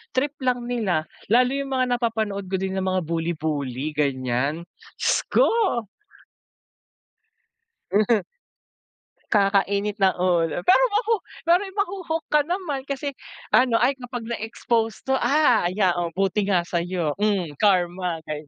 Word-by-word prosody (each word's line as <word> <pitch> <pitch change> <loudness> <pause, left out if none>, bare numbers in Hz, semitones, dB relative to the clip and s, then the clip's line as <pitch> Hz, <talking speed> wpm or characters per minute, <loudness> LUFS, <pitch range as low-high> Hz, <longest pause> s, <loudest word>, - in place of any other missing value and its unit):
trip 285 +3 0
lang 245 -1 0
nila, 195 -10 -1 0.2
lalo 250 +2 +5
yung 275 -1 -3
mga 255 -1 +1
napapanood 220 -5 -2
ko - - +1
din 190 0 -3
na 190 - -1
mga 185 -1 0
bully-bully, 155 -4 -2
ganyan, 140 +2 -1 0.4
s - - +2
ko. - - +5 2.4
Mhm. 210 +2 +3 1.1
Kakainit 200 0 +2
ng 190 -2 +3
ulo. 175 -2 +1
Pero - - +5
mahu 445 +1 +1 0.3
pero 340 +2 +4
'yong 385 - -12
mahu-hook 365 -5 -2
ka 300 -1 +3
naman 325 -7 -3
kasi 280 +1 -3 0.4
ano, 250 -2 +4
"Ay, 245 +4 +4
kapag 245 -1 -6
na-exposed 225 0 -2
to, 265 0 +1
ah, 265 - +3
ya 185 0 +2
o 170 -1 -2
buti 195 +1 0
nga 185 -4 +2
sayo. 175 -2 -2
Hmm, 200 -6 0
karma." 180 -4 +1
Gay 150 -1 -6
205 Hz, 135 wpm, -24 LUFS, 175-255 Hz, 2.4 s, lalo